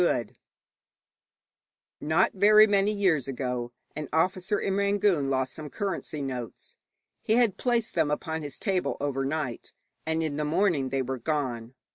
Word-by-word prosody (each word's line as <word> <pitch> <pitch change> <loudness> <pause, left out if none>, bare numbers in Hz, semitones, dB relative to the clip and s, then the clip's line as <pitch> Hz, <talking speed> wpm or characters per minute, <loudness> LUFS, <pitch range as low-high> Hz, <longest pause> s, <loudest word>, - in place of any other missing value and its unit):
Dammapada. 120 -10 +1 1.7
Not 160 +5 +2
very 210 +2 +7
many 205 -1 +2
years 185 - +1
ago 125 -2 -3 0.2
an 150 -2 -5
officer 185 +5 +1
in 195 - -1
Rangoon 200 -6 +2
lost 130 -1 -1
some 155 -2 -7
currency 190 -7 -3
notes. 125 -4 -6 0.4
He 220 - +1
had 230 -4 +3
placed 240 -3 0
them 145 - +1
upon 160 +2 -2
his 145 -3 -6
table 190 -4 -1
overnight, 140 -1 -3 0.3
and 160 0 -1
in 150 -2 -2
the 150 - -1
morning 150 -3 +1
they 135 0 0
were 130 0 -4
gone. 125 -4 -3
155 Hz, 145 wpm, -27 LUFS, 135-195 Hz, 1.7 s, very